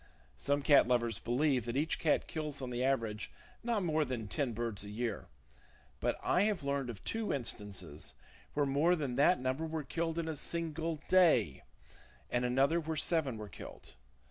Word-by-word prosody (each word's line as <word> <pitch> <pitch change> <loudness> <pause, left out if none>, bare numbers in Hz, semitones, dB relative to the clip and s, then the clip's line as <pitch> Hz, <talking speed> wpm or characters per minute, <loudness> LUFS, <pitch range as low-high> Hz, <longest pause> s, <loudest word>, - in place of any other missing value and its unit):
Some 140 - 0
cat 140 -3 +6
lovers 120 -3 +1
believe 130 0 +1
that 120 +2 -2
each 155 +3 0
cat 155 - +2
kills 150 -3 -4
on 130 -2 -4
the 120 +1 -1
average 115 -6 0 0.3
not 230 -4 0
more 155 -2 +2
than 125 -6 -4
ten 135 +3 -1
birds 115 -3 -3
a 105 - -8
year; 110 0 -3 0.7
but - - 0
I 180 - +3
have 205 -7 0
learned 140 -2 -1
of 110 -5 -7
two 225 -1 -1
instances 100 - -3 0.4
where 145 -1 +3
more 145 +6 +3
than 140 -7 -2
that 160 +6 +5
number 130 +5 -1
were 160 -1 -3
killed 165 +2 -2
in 165 -1 -1
a 160 - -2
single 165 +1 -1
day, 160 - +4 0.7
and 120 0 +1
another 135 +7 +3
where 160 -1 -3
seven 150 -6 +1
were 105 -1 -6
killed. 100 - -11
140 Hz, 175 wpm, -34 LUFS, 120-160 Hz, 0.7 s, cat